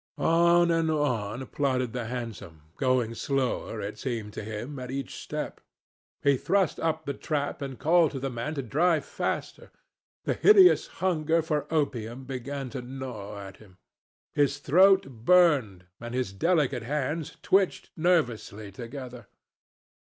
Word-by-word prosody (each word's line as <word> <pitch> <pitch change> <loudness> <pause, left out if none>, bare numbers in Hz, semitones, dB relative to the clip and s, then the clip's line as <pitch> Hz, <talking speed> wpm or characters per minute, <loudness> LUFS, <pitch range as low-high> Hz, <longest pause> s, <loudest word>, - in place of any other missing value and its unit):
On 170 +1 +4
and 165 -1 +2
on 130 -6 -1
plodded 130 -4 -1
the 125 -2 -3
hansom, 110 -9 -7
going 130 -3 +1
slower, 130 -2 -2
it 100 +1 -6
seemed 115 -6 -4
to - - -6
him, 110 +6 -6
at 125 -1 -6
each 135 0 -4
step. - - -5 0.6
He 140 -1 +4
thrust 190 +4 +1
up 160 -1 -1
the 140 - -2
trap 145 0 -3
and 135 -2 -5
called 165 0 +4
to 135 - -3
the 135 0 -3
man 125 +6 -4
to 140 - -3
drive 155 +6 +2
faster. - - -4 0.5
The - - 0
hideous 390 -3 +6 0.2
hunger 165 -2 +2
for 150 -2 -2
opium 130 -5 -1
began 135 0 -5
to 130 - -5
gnaw 125 -6 -7
at 95 -1 -10
him. 95 -4 -18 0.6
His 145 -1 +2
throat 190 +7 +5
burned 130 - +3
and 120 +1 -6
his 125 -7 -2
delicate 140 - +1
hands 150 +5 -3
twitched 190 -1 +1
nervously 120 - 0
together. 125 +1 -8
135 Hz, 145 wpm, -27 LUFS, 115-155 Hz, 0.6 s, hideous